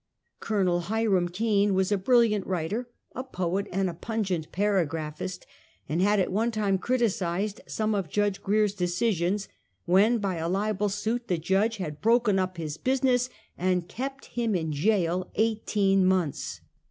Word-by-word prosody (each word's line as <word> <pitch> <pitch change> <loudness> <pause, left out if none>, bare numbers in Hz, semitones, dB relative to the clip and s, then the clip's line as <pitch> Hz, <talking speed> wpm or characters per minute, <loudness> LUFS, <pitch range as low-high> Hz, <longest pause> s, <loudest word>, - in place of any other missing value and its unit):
Col. 185 -5 +1
Hiram 195 -1 +1
Kane 205 +1 +1
was 190 +1 +1
a 205 - +3
brilliant 220 -2 +3
writer, 190 +7 -2 0.2
a 255 - -4
poet 190 -4 -2
and 185 -3 -2
pungent 195 -8 -2
para 195 -3 +2
graphist, 155 +4 -5 0.4
and 165 +4 0
had 205 +1 +3
at 185 - +1
one 220 +5 +1
time 205 -4 0
criticised 205 -5 0
some 215 0 -1
of 195 -6 -2
Judge 205 +2 0
Grier's 210 0 +2
decisions, 185 +1 0 0.4
when 200 +7 +4
by 195 -5 -2
a 165 +1 -2
libel 205 +2 0
suit 220 +4 -2
the 180 - +1
Judge 195 +7 +1
had 155 -6 -5
broken 230 -3 +3
up 185 -1 -2
his 155 -2 -4
business 255 -1 +1 0.3
and 180 -1 +1
kept 270 +6 -5
him 230 -3 0
in 160 -3 -1
jail 180 +2 +1
eighteen 210 -3 +2
months. 185 -5 0
195 Hz, 155 wpm, -27 LUFS, 180-220 Hz, 0.4 s, when